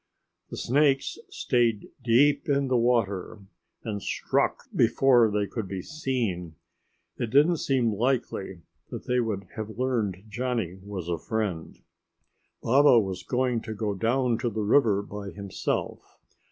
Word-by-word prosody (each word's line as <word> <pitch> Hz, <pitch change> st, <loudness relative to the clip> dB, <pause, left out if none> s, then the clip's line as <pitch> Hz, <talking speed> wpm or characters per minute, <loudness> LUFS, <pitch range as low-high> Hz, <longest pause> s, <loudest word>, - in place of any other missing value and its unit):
The -, -, -7 dB
snakes 135 Hz, +1 st, +1 dB
stayed 115 Hz, -4 st, 0 dB
deep 140 Hz, +5 st, +3 dB
in 140 Hz, -1 st, +1 dB
the 130 Hz, -, +2 dB
water 110 Hz, -5 st, 0 dB, 0.4 s
and 105 Hz, -3 st, -4 dB
struck -, -, 0 dB
before 125 Hz, -4 st, +4 dB
they 105 Hz, 0 st, 0 dB
could 110 Hz, 0 st, -5 dB
be 95 Hz, -1 st, -5 dB
seen. 115 Hz, -, -3 dB, 0.6 s
It 120 Hz, -, -2 dB
didn't 150 Hz, +8 st, +4 dB
seem 125 Hz, -6 st, +1 dB
likely 105 Hz, -6 st, -2 dB, 0.3 s
that -, -, -7 dB
they 125 Hz, 0 st, +1 dB
would 105 Hz, -5 st, -2 dB
have 110 Hz, 0 st, -6 dB
learned 110 Hz, -7 st, -1 dB
Johnny 115 Hz, -6 st, -3 dB
was 95 Hz, -3 st, -6 dB
a 85 Hz, -1 st, -2 dB
friend. 105 Hz, -8 st, -3 dB, 0.9 s
Baba 135 Hz, 0 st, +6 dB
was 95 Hz, -4 st, -3 dB
going 125 Hz, -2 st, 0 dB
to 110 Hz, -1 st, -6 dB
go 105 Hz, -1 st, -2 dB
down 120 Hz, +3 st, +1 dB
to 120 Hz, -, -1 dB
the 110 Hz, -1 st, -3 dB
river 105 Hz, -3 st, +3 dB
by 100 Hz, -1 st, -7 dB
himself. 100 Hz, -1 st, -4 dB
115 Hz, 140 wpm, -27 LUFS, 100-130 Hz, 0.9 s, Baba